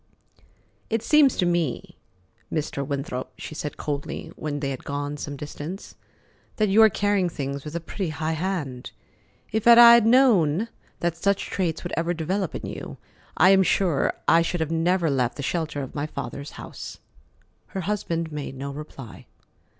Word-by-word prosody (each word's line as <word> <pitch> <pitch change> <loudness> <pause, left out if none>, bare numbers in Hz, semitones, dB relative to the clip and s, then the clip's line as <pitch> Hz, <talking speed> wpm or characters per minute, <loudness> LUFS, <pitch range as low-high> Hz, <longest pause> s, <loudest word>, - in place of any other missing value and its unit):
"It 225 0 -1
seems 290 0 +5
to 180 - +2
me, 170 -6 -1 0.6
Mr. 150 -3 -2
Winthrop," 135 -2 -4
she - - -7
said 150 -1 -5
coldly, 145 -1 -4
when 145 -1 -4
they 140 -1 -2
had 130 - -6
gone 145 +1 -3
some 145 0 -6
distance, 150 +6 -7 0.6
"that 215 -2 +1
you 210 +3 +5
are 220 - +8
carrying 205 -3 +1
things 140 -3 -4
with 150 +1 -7
a - - 0
pretty 175 +2 -4
high 155 +1 -2
hand. 160 -7 -3 0.6
If 220 +1 0
I 235 0 +10
had 235 -2 +6
known 225 - +4 0.3
that 170 -1 0
such 200 +3 +1
traits 170 -5 -1
would 175 - -5
ever 170 +1 0
develop 180 +3 -2
in - - -5
you, - - -7 0.4
I 185 +3 +7
am 195 0 +6
sure 180 -5 +2
I 165 - +6
should 165 -1 -1
never 170 +2 +1
have 150 - +2
left 125 -2 0
the 140 - -4
shelter 155 -2 -2
of 130 - -8
my 145 +1 -2
father's 140 -1 -6
house." - - -8 0.7
Her 190 - -5
husband 170 -4 -2
made 145 -2 -5
no 140 +1 -5
reply. 140 -5 -10
165 Hz, 170 wpm, -25 LUFS, 145-190 Hz, 0.7 s, I